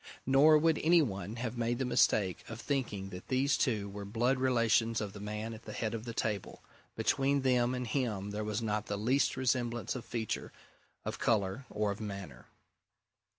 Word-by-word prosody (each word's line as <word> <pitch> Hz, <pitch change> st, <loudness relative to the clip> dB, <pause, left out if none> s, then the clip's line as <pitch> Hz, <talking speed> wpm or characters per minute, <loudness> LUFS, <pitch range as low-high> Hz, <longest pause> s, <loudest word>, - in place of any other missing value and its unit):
Nor 145 Hz, +4 st, +6 dB
would 160 Hz, 0 st, +3 dB
any 165 Hz, +1 st, +5 dB
one 100 Hz, -3 st, -4 dB
have 120 Hz, 0 st, -4 dB
made 120 Hz, +1 st, 0 dB
the 130 Hz, -, -1 dB
mistake 100 Hz, -6 st, +2 dB
of 115 Hz, 0 st, -7 dB
thinking 120 Hz, -9 st, -2 dB
that 90 Hz, -1 st, -9 dB
these 135 Hz, +2 st, +2 dB
two 110 Hz, -7 st, 0 dB
were 100 Hz, +1 st, -7 dB
blood 120 Hz, +6 st, +1 dB
relations 115 Hz, -3 st, +2 dB
of 105 Hz, -2 st, -4 dB
the 105 Hz, -, -9 dB
man 105 Hz, +2 st, -4 dB
at 110 Hz, +1 st, -11 dB
the -, -, -7 dB
head 110 Hz, -1 st, -2 dB
of 115 Hz, 0 st, -4 dB
the 115 Hz, -, -5 dB
table 105 Hz, -4 st, -3 dB, 0.3 s
between 140 Hz, 0 st, +2 dB
them 125 Hz, -1 st, +2 dB
and 125 Hz, 0 st, -3 dB
him 110 Hz, -5 st, -2 dB
there 105 Hz, +1 st, -3 dB
was 105 Hz, +2 st, -2 dB
not 105 Hz, -1 st, -1 dB
the 105 Hz, -, -2 dB
least 130 Hz, +6 st, +2 dB
resemblance 120 Hz, -2 st, 0 dB
of 125 Hz, -, -5 dB
feature, 110 Hz, -3 st, -3 dB, 0.5 s
of -, -, -4 dB
colour, 110 Hz, +3 st, 0 dB
or 105 Hz, -1 st, 0 dB
of 100 Hz, -, -6 dB
manner. 100 Hz, -, -7 dB
115 Hz, 190 wpm, -32 LUFS, 105-130 Hz, 0.5 s, Nor